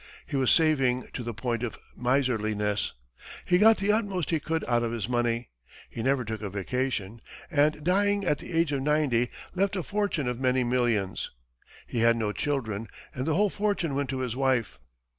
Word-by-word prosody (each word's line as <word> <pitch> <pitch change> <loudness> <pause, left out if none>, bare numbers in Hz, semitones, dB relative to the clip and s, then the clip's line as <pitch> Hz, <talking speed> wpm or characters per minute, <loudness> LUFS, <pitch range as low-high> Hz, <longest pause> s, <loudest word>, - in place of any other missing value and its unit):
He - - -5
was 130 -2 +2
saving 135 -6 +3
to - - -4
the 120 0 -3
point 115 +1 -2
of 120 -2 -3 0.2
miserliness; 110 -5 0 0.5
he 180 0 +3
got 220 +2 +7
the 200 +1 +2
utmost 200 -6 0
he 160 - +2
could 160 +2 -2
out 120 -1 +2
of 115 -1 -1
his 115 -4 -3
money; 120 -1 0 0.4
he 115 - -5
never 130 0 +1
took 110 0 -4
a 105 - -3
vacation 110 +1 -2 0.3
and 150 +1 +2
dying, 200 +3 +2
at 150 -5 +1
the - - -8
age 165 -2 +2
of 140 -2 0
ninety, 135 -5 +2 0.2
left 195 +1 +1
a 185 - -2
fortune 200 -9 -1
of 125 -1 -2
many 130 -1 +2
millions. 120 -6 0 0.6
He 120 - -3
had 115 0 +5
no 110 -2 0
children 115 -6 -2 0.3
and 130 +3 -3
the 160 - +2
whole 205 +1 +3
fortune 200 -7 0
went 140 -1 -1
to 130 -1 -2
his 125 -2 -2
wife. 130 -5 0
130 Hz, 190 wpm, -28 LUFS, 115-160 Hz, 0.6 s, got